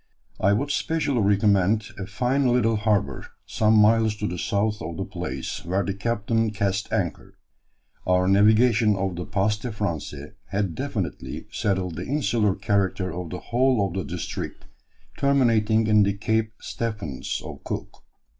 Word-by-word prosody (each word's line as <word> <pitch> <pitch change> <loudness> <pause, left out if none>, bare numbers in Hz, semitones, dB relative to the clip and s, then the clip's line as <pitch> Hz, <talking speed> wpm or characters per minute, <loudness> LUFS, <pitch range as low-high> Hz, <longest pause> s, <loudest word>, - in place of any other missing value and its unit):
I 100 +2 +3
would 140 +7 0
specially 145 -6 0
recommend 100 +1 +3
a 95 - -5
fine 125 +6 +1
little 120 -2 +3
harbour, 105 - 0 0.2
some 110 0 +2
miles 110 0 +4
to 105 0 -3
the 90 -1 -4
south 105 +1 0
of 80 0 -5
the - - -3
place, 65 0 -5
where 95 +4 0
the 100 - -2
captain 115 +2 0
cast 100 -1 -2
anchor. - - -3 0.7
Our 90 0 +3
navigation 110 +2 +4
of 95 -1 -2
the 90 +1 -5
'Passe 105 +2 0
des 125 - -3
Français' 80 -9 -4
had 100 -3 -2
definitively - - -4
settled 95 -4 -1
the 90 - -5
insular 115 -8 +1
character 95 -2 0
of 90 -1 -5
the 90 - -5
whole 125 -4 +3
of 95 - -4
the 95 0 -2
district 90 -1 -5 0.5
terminating 115 -6 +3
in 105 -1 +5
the 100 0 +3
'Cape 110 +2 -1
Stephens' 105 - -4
of - - -9
Cook. - - -6
105 Hz, 155 wpm, -25 LUFS, 95-110 Hz, 0.7 s, in